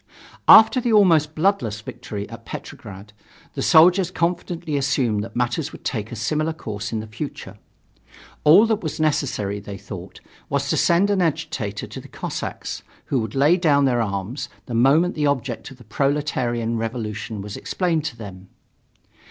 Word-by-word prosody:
After 235 +4 +8
the 240 -1 0
almost 165 -8 +4
bloodless 155 - 0
victory 110 -4 -7
at - - -10
Petrograd, 100 +2 -9 0.4
the - - -4
soldiers 180 +3 +5
confidently 170 -2 -2
assumed 130 -6 +1
that 115 +1 -10
matters 125 +5 -1
would - - -13
take 110 -4 -3
a - - -5
similar 155 +9 -1
course 110 -7 -6
in 110 -2 -2
the - - -8
future. 115 +7 -7 0.8
All 175 +9 +7
that 220 -2 0
was 160 -2 -4
necessary, 130 -10 0
they 100 -1 -8
thought, 100 -3 -9 0.3
was - - -1
to - - +2
send 180 +4 +3
an 195 -2 +2
agitator 150 - -2
to - - -9
the - - -13
Cossacks, - - -5 0.2
who 135 - 0
would 110 0 -4
lay 145 +6 +4
down 145 -6 +3
their 120 -3 +2
arms 100 +4 -3 0.2
the 120 - -7
moment 140 +10 +4
the 150 -1 0
object 130 -4 -2
of 135 - -13
the 125 - -15
proletarian 120 -2 -1
revolution 110 -2 -4
was 105 0 -7
explained 170 -4 -1
to 130 -6 -4
them. 95 -4 -10
135 Hz, 165 wpm, -22 LUFS, 110-160 Hz, 0.8 s, After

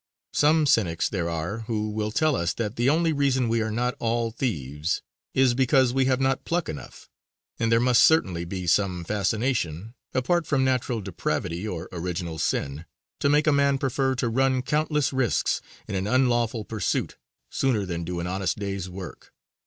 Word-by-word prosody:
Some 155 +1 +4
cynics 95 - +2
there 85 -4 -2
are 85 +6 -3
who 110 -2 -1
will 105 0 -2
tell 155 +7 +2
us 85 -1 -1
that 110 -2 -3
the 120 +3 +2
only 160 +2 +2
reason 135 -4 +1
we 115 0 +1
are 110 - -1
not 120 +3 0
all 115 0 0
thieves 75 - -2 0.3
is 130 -2 +4
because 130 0 +3
we 135 0 +2
have 130 0 +2
not 135 -1 +1
pluck 170 0 -1
enough; 75 - -8 0.5
and 115 0 +1
there 115 - +5
must 125 0 +4
certainly 95 - +4
be 90 +1 -5
some 90 0 +1
fascination, 105 - -1 0.2
apart 165 +7 +1
from 135 -3 +2
natural 125 -3 0
depravity 90 0 -3
or 90 -3 -5
original 85 -2 -4
sin, 70 +4 -2 0.3
to 140 - +2
make 150 +1 +3
a 155 - +4
man 140 -1 +3
prefer 135 0 0
to 125 - -1
run 130 +2 +1
countless 150 0 0
risks 130 -5 +1 0.3
in - - -5
an 95 +1 -1
unlawful 120 -3 +1
pursuit 110 -4 -2 0.3
sooner 120 -7 +1
than 85 -2 -4
do 90 +1 -4
an 85 - -3
honest 95 +1 -1
day's 100 -2 -4
work. 90 -1 -9
115 Hz, 175 wpm, -25 LUFS, 90-130 Hz, 0.5 s, there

